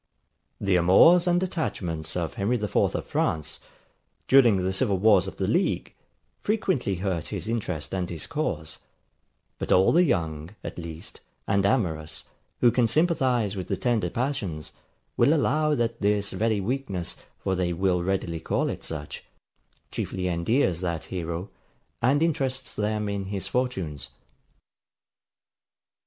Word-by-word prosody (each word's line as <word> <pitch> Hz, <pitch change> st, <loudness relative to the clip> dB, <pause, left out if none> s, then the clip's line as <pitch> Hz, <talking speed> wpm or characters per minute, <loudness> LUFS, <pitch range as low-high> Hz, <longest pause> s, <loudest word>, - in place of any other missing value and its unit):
] -, -, -49 dB
The 90 Hz, -, +5 dB
amours 165 Hz, -, +6 dB
and 175 Hz, +1 st, +3 dB
attachments 85 Hz, -, -3 dB
of 85 Hz, -3 st, -2 dB
Harry 105 Hz, +5 st, 0 dB
the 105 Hz, -, -2 dB
IVth 105 Hz, -, +1 dB
of -, -, -3 dB
France, 75 Hz, -2 st, -1 dB, 0.7 s
during 125 Hz, -6 st, +6 dB
the 95 Hz, 0 st, 0 dB
civil 100 Hz, -1 st, +1 dB
wars 100 Hz, -2 st, +4 dB
of -, -, -6 dB
the -, -, -1 dB
league, -, -, 0 dB, 0.5 s
frequently 185 Hz, -, 0 dB
hurt 90 Hz, -3 st, -2 dB
his -, -, -5 dB
interest 110 Hz, -9 st, -3 dB
and 90 Hz, -2 st, -1 dB
his 85 Hz, -3 st, -5 dB
cause; 145 Hz, -, -3 dB, 0.8 s
but -, -, -3 dB
all 95 Hz, +1 st, +5 dB
the 175 Hz, +2 st, +5 dB
young, 80 Hz, -, -1 dB
at -, -, -6 dB
least, 80 Hz, -1 st, -9 dB, 0.3 s
and 100 Hz, 0 st, +3 dB
amorous, 80 Hz, -9 st, -1 dB, 0.4 s
who 120 Hz, -, +6 dB
can 120 Hz, -1 st, +3 dB
sympathize 125 Hz, -, +2 dB
with 95 Hz, -2 st, -5 dB
the 100 Hz, -, -1 dB
tender 110 Hz, -4 st, +1 dB
passions, 110 Hz, -, -3 dB, 0.5 s
will 140 Hz, +7 st, +5 dB
allow 150 Hz, 0 st, +2 dB
that 115 Hz, -2 st, -1 dB
this 100 Hz, 0 st, +1 dB
very 110 Hz, -1 st, 0 dB
weakness, 100 Hz, -5 st, -3 dB, 0.2 s
for 95 Hz, -, -2 dB
they 90 Hz, -1 st, 0 dB
will 90 Hz, 0 st, +1 dB
readily 90 Hz, -2 st, -1 dB
call -, -, 0 dB
it -, -, -7 dB
such, 75 Hz, -2 st, -6 dB, 0.7 s
chiefly 90 Hz, -1 st, -3 dB
endears 90 Hz, -, +1 dB
that 85 Hz, -3 st, -2 dB
hero, 85 Hz, +1 st, -5 dB, 0.5 s
and 140 Hz, +6 st, +3 dB
interests 135 Hz, -5 st, -1 dB
them 105 Hz, 0 st, -1 dB
in 100 Hz, -1 st, -2 dB
his 95 Hz, -1 st, -4 dB
fortunes. 95 Hz, -, -2 dB
100 Hz, 145 wpm, -26 LUFS, 85-125 Hz, 0.8 s, amours